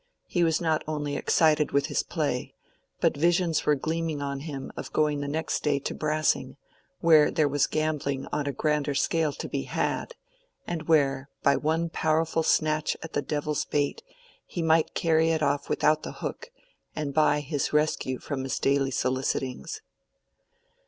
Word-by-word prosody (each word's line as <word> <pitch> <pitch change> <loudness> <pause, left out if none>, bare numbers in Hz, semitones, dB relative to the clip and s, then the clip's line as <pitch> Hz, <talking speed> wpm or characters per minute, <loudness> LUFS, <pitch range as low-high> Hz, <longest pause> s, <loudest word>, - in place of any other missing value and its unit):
He 175 - 0
was 160 -2 +2
not 160 -2 0
only 145 -2 -2
excited 155 0 +2
with 140 0 +3
his - - 0
play, - - -3 0.5
but - - +3
visions 170 +1 +1
were 150 - +5
gleaming 160 +1 -2
on 140 -1 -3
him 140 -2 -6
of - - -7
going 150 -1 +1
the 145 - -3
next 155 +1 -2
day 145 -2 +1
to 140 - -4
Brassing, 155 0 0 0.4
where 155 -3 +6
there 155 -2 +2
was 145 0 +2
gambling 150 -3 -1
on 145 -1 -1
a - - +1
grander 150 +1 0
scale 160 +1 +1
to - - -6
be - - -3
had, - - -2 0.5
and 160 -2 -4
where, 140 -4 +2
by 140 - +5
one 160 +2 0
powerful 160 +1 +1
snatch 155 -1 +1
at 165 - -8
the - - +1
devil's 150 0 -2
bait, 145 - -1 0.5
he 170 - -3
might 160 0 +2
carry 160 -1 +3
it 160 -1 +1
off 140 0 0
without 155 0 +2
the - - -6
hook, - - -6 0.5
and 145 -2 -3
buy 150 0 +3
his 145 0 -2
rescue 150 -4 +1
from 140 0 -4
his 130 - -2
daily 135 0 +2
solicitings. 130 - -2
150 Hz, 165 wpm, -27 LUFS, 140-160 Hz, 0.5 s, where